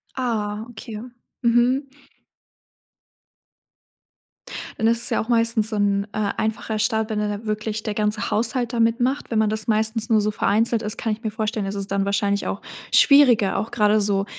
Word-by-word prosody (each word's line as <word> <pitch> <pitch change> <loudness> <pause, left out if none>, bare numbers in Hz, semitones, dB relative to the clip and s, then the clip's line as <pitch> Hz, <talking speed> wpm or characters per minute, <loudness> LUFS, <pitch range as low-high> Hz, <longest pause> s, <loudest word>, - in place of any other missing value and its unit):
Ah, 220 -4 -2
okay, 220 -2 -8 0.4
mhm. 245 +4 +2 2.9
Dann 225 - +1
ist 235 0 +2
es - - +4
ja - - +1
auch 220 - -8
meistens 230 -2 +2
so 220 - -4
'n, 200 -1 +1
äh, 210 -2 -1
einfacher 220 0 -2
Start, 220 +1 0
wenn 215 -1 -2
da 210 - -1
dann 205 +1 -5
wirklich 215 0 -3
der 215 -2 -3
ganze 210 0 -1
Haushalt 240 +2 0
da 235 - -1
mitmacht. 240 +4 +1
Wenn 220 - +1
man 215 -1 +2
das 215 +1 -3
meistens 220 0 +1
nur 220 -2 +4
so 210 +1 0
vereinzelt 225 +3 +1
ist, 215 +1 -4
kann 225 - -1
ich 225 +3 -9
mir 215 - -2
vorstellen, 215 -1 -2
dass 195 +1 -4
es 200 0 -4
dann 195 0 -1
wahrscheinlich 200 0 0
auch 200 - -4 0.3
schwieriger 250 -8 +5
auch 220 +3 -3
grade 210 -1 +3
so 200 -1 0
220 Hz, 185 wpm, -22 LUFS, 210-230 Hz, 2.9 s, schwieriger